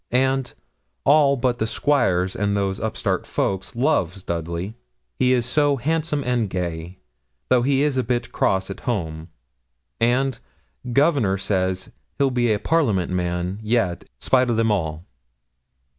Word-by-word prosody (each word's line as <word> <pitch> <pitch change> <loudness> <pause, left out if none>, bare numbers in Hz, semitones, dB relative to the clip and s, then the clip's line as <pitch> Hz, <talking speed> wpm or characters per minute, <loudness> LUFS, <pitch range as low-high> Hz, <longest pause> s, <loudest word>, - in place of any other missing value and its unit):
And 130 0 +1 0.5
'all 140 -1 +5
but 120 -1 0
the 110 - 0
squires 95 -10 +1
and 100 0 0
those 95 -1 -1
upstart 110 -1 -2
folk 95 -1 -1
loves 100 - 0
Dudley, 85 +4 -3 0.5
he 125 - +3
is 125 -2 +2
so 145 +3 +2
handsome 150 +2 -1
and 120 -4 0
gay 85 -1 -4 0.5
though 125 -1 +4
he 140 +3 +2
be 135 -3 0
a - - +4
bit 120 0 -2
cross 95 0 0
at - - -7
home.' 80 -8 -3 0.7
And, 125 +1 +1 0.5
'Governor 135 - +3
says, 95 -1 -1 0.3
he'll 140 -2 +2
be 120 -2 +2
a 105 - +2
Parliament 110 - +1
man 90 +1 -2
yet, 110 -5 0
spite 130 -1 +2
o' 120 - +2
them 115 0 +2
all.' 80 -4 -2
115 Hz, 145 wpm, -22 LUFS, 95-130 Hz, 0.7 s, all